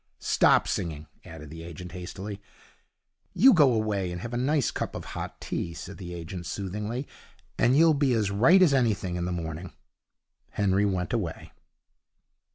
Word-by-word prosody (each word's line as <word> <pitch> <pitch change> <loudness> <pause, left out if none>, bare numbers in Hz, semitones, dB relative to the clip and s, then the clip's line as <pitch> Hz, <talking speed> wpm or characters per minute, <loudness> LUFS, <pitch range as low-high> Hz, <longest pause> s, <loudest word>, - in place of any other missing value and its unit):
'Stop - - +3
singing,' 80 -3 -3 0.2
added 75 -2 -10
the 80 0 -8
agent, 85 +1 -9
hastily. 95 +3 -7 0.9
'You 265 +3 +7
go 150 -8 +6
away 105 -5 0
and 90 - -5
have 120 +3 -6
a - - -1
nice 135 +2 +1
cup - - -4
of - - -6
hot - - -6
tea,' 85 -1 -4
said 90 +4 -9
the 90 -2 -7
agent, 85 +1 -7
soothingly, 105 +7 -4 0.5
'and 125 +3 +4
you'll 165 0 +6
be 140 -3 +2
as 105 -4 +1
right 150 - +6
as 160 -6 +4
anything 110 -8 +1
in 85 0 -2
the 90 - -2
morning.' 85 +1 -5 0.8
Henry 100 0 +2
went 90 -3 -1
away. - - -3
100 Hz, 165 wpm, -27 LUFS, 90-120 Hz, 0.9 s, You